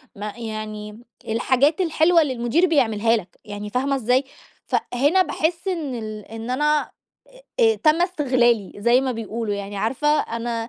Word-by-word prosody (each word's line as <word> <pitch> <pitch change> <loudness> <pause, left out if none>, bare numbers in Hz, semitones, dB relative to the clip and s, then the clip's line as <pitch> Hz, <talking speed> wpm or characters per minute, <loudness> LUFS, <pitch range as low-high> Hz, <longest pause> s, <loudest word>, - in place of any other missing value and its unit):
ما 210 0 -6
يعني 215 -1 -6 0.3
الحاجات 265 +9 +2
الحلوة 330 0 +4
اللي 285 -4 0
المدير 240 +8 +1
بيعملها 230 - +2
لك! 180 -3 -10
يعني 205 0 -6
فاهمة 270 +5 0
إزاي؟ 255 +2 +2 0.4
ف - - -2 0.2
هنا 290 +10 +3
باحِسّ 345 +2 -1
إن 315 -9 -2
ال 215 -2 -6
إن 225 +2 -8
أنا 295 +3 +2 0.8
آآ - - +6
آآ - - -3
تَمّ 310 +3 +4
استغلالي، 250 - +1
زي 235 +5 +3
ما 265 -1 -1
بيقولوا 225 -1 -4
يعني 200 0 -6
عارفة 235 +9 -1
أنا 230 0 -4
240 Hz, 155 wpm, -22 LUFS, 215-295 Hz, 0.8 s, آآ